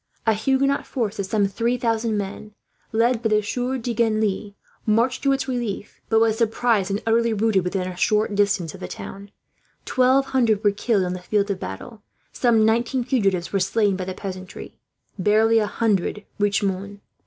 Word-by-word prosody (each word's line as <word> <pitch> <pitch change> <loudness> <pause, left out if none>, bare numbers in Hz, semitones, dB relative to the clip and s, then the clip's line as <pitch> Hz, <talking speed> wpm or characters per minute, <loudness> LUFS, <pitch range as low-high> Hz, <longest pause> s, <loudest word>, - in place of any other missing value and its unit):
A 225 - +4
Huguenot 270 +5 +1
force 225 -6 -3
of 195 - -2
some 205 0 +2
three 230 +5 0
thousand 225 -2 0
men, 205 +1 -6 0.4
led 230 +1 +2
by 225 - 0
the 215 0 +2
Sieur 250 +5 -2
de 240 -1 -3
Genlis, 215 -3 0 0.3
marched 235 +4 +1
to 275 - +2
its 270 0 0
relief; 240 -6 -4
but 225 - +4
was 225 0 +2
surprised, 225 -3 +1
and 200 +1 -2
utterly 230 0 +2
routed, 215 -3 +2
within 180 0 -2
a 185 - -6
short 210 +3 +1
distance 200 -5 +1
of - - -11
the 90 - -6
town 195 - -8 0.6
1200 255 -4 +2
were 205 - +4
killed 205 0 0
on 180 - -2
the 180 - -5
field 200 +2 0
of 190 - -3
battle, 150 - -8 0.3
some 230 -3 +3
1900 235 +3 +1
fugitives 195 -9 0
were 195 - +2
slain 205 +1 +1
by 185 -1 -4
the 185 0 -5
peasantry, 185 -2 -8 0.4
barely 220 +4 +4
a 210 - 0
hundred 210 -2 -1
reached 205 0 +1
Mons. 200 +1 -3
215 Hz, 180 wpm, -23 LUFS, 200-235 Hz, 0.6 s, A